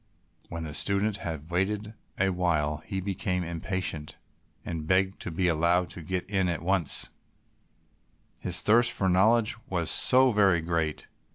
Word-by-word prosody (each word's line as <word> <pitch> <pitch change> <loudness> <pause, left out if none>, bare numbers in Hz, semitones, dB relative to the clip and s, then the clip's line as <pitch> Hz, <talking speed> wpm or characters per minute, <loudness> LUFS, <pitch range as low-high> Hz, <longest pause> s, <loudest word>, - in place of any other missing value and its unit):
When 85 -1 -5
the 75 -2 -6
student 100 +6 0
had 80 -2 -6
waited 105 +4 -1 0.3
a 95 0 +2
while 80 -5 0
he 95 -3 -3
became 90 -1 -2
impatient, 85 -2 -4 0.5
and 80 -2 -5
begged 95 +2 +1
to - - -4
be 90 +2 -1
allowed 85 +1 +1
to 90 - -8
get 90 +2 -3
in 95 -3 0
at 85 -1 -3
once, 90 -4 +1 1.3
his 90 -1 -2
thirst 115 +3 +4
for 95 - -1
knowledge 110 +5 +3
was 85 -3 0
so 130 0 +6
very 100 -6 +3
great. 80 -2 -2
90 Hz, 150 wpm, -27 LUFS, 85-100 Hz, 1.3 s, so